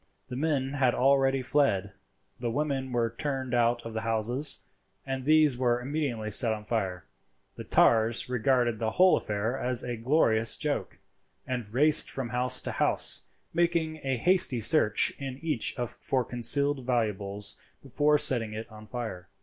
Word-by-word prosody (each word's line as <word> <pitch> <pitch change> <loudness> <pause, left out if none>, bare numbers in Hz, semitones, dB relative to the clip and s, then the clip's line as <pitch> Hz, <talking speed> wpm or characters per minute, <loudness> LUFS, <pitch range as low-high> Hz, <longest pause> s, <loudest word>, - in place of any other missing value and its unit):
The 125 - -6
men 140 -2 -1
had 130 -4 +1
already 135 0 +2
fled; 100 -9 0 0.5
the 120 -1 -3
women 135 0 -2
were 115 -2 -1
turned 135 -2 -3
out 120 0 +1
of 115 - -7
the 110 - -3
houses, 115 +5 +2 0.4
and 135 -1 -5
these 155 -4 +3
were 120 -1 +1
immediately 125 -5 -3
set 110 +2 +3
on 105 -1 -8
fire. 95 -6 -3 0.5
The - - -10
tars 115 0 +2
regarded 125 -2 0
the 110 -1 -1
whole 185 0 +5
affair 105 +4 -3
as 125 -1 0
a 120 -1 -4
glorious 115 -3 +1
joke, 150 -2 -3 0.5
and 125 -6 -5
raced 150 +5 +5
from 130 -3 -5
house 125 +1 0
to - - -4
house, - - 0 0.3
making 170 -2 0
a 135 -2 -2
hasty 175 -3 +3
search 110 -2 +3
in 135 -2 -6
each 150 -8 -1 0.2
for 130 -2 -1
concealed 140 +3 0
valuables 105 -5 -1 0.3
before 145 +3 +1
setting 115 -6 +1
it 110 +1 -6
on 110 0 -13
fire. 110 -7 -7
125 Hz, 155 wpm, -27 LUFS, 115-140 Hz, 0.5 s, whole